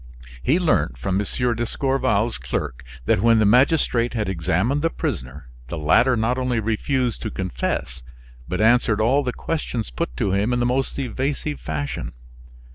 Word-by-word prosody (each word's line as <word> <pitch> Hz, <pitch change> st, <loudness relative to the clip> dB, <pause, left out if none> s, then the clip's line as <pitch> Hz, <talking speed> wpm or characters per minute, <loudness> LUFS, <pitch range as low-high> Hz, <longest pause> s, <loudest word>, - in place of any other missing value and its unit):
He 145 Hz, -, +2 dB
learnt 75 Hz, -, +1 dB
from 95 Hz, +9 st, -1 dB
M. 120 Hz, +3 st, -1 dB
d'Escorval's 120 Hz, -2 st, 0 dB
clerk 60 Hz, +1 st, -4 dB, 0.2 s
that -, -, +2 dB
when 115 Hz, 0 st, +5 dB
the 110 Hz, -, +4 dB
magistrate 120 Hz, 0 st, +3 dB
had 105 Hz, -4 st, -1 dB
examined 95 Hz, -, 0 dB
the 165 Hz, -, +2 dB
prisoner, 65 Hz, -, -5 dB, 0.2 s
the 85 Hz, -, -5 dB
latter 80 Hz, -, +4 dB
not 120 Hz, +3 st, 0 dB
only 125 Hz, -2 st, 0 dB
refused 115 Hz, +3 st, -1 dB
to 110 Hz, -, -3 dB
confess, 90 Hz, -9 st, -3 dB, 0.5 s
but 90 Hz, +1 st, -3 dB
answered 110 Hz, -1 st, +3 dB
all 125 Hz, +6 st, +3 dB
the 125 Hz, -3 st, -2 dB
questions 125 Hz, -, -3 dB
put -, -, -4 dB
to 100 Hz, -, 0 dB
him 100 Hz, +5 st, +1 dB
in 120 Hz, -, +1 dB
the 120 Hz, -, +1 dB
most 130 Hz, +2 st, 0 dB
evasive 140 Hz, +3 st, -2 dB
fashion. 75 Hz, -2 st, -4 dB
115 Hz, 160 wpm, -22 LUFS, 90-130 Hz, 0.5 s, when